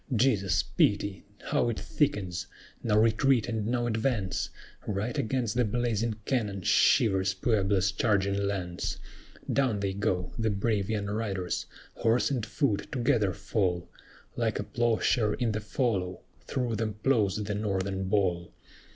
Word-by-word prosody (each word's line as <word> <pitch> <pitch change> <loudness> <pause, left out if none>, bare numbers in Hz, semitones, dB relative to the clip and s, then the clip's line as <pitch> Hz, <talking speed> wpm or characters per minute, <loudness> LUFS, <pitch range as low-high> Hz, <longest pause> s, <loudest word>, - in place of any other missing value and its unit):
"Jesu, 105 -5 +2
pity! 100 -1 +2 0.2
how 145 -5 +1
it 115 - -2
thickens! 105 - -1 0.3
now 105 -2 +2
retreat 115 +2 +3
and 110 -3 -2
now 120 0 0
advance! 110 -4 -1 0.4
Right 105 +4 -2
against 120 -2 0
the 125 - +2
blazing 115 -1 0
cannon 105 -8 -1
shivers 95 -1 +3
Puebla's 100 -2 +2
charging 100 -1 +1
lance! 90 -3 -3 0.6
Down 130 -7 +2
they 100 -1 -1
go, 95 -3 -1
the 110 0 +1
brave 100 0 0
young 105 -2 -1
riders; 100 -3 -2 0.3
horse 115 +4 +2
and 125 -5 -1
foot 105 +1 -1
together 120 -6 +2
fall; 95 -3 -1 0.5
Like - - 0
a - - -2
ploughshare 115 -2 +1
in 120 -3 0
the 110 - -1
fallow, 105 -5 -1 0.3
through 120 -4 -1
them 110 -1 -2
ploughs 110 -8 +3
the 105 -1 -2
Northern 95 -2 -1
ball." 95 -4 0
105 Hz, 135 wpm, -29 LUFS, 95-115 Hz, 0.6 s, retreat